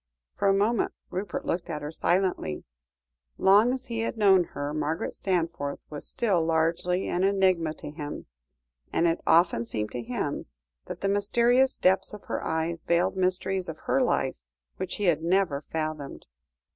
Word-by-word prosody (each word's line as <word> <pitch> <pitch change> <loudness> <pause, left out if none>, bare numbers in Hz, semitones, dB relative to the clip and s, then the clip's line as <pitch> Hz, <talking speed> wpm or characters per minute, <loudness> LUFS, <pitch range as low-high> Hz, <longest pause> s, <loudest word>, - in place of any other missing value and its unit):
For - - +1
a 195 - +5
moment 210 +3 +1 0.2
Rupert 195 +3 -4
looked 175 0 -2
at 150 -3 -4
her 150 - -4
silently. 175 - 0 0.7
Long 205 +5 +5
as 260 0 -3
he 230 -3 -4
had 225 0 -2
known 190 -4 +5
her, 145 -1 -5
Margaret 155 +2 -2
Stanforth 170 -6 -1
was 150 - -6
still 200 -9 +1
largely 165 +3 +1
an 180 - 0
enigma 185 -5 +2
to - - -7
him, 150 -1 -6 0.7
and 170 - +2
it 165 0 +1
often 165 -8 +4
seemed 105 -2 -4
to 120 - -4
him 115 - -3 0.4
that - - -7
the 195 - 0
mysterious 235 +6 +3
depths 190 +3 +2
of 210 - -10
her - - -3
eyes 160 +1 -2
veiled 170 +2 +1
mysteries 185 0 0
of 160 - -6
her 270 - +2
life 135 - 0 0.4
which - - -3
he 205 - -4
had 170 -5 +3
never 170 -4 +1
fathomed. 155 -2 -5
175 Hz, 165 wpm, -27 LUFS, 155-195 Hz, 0.7 s, a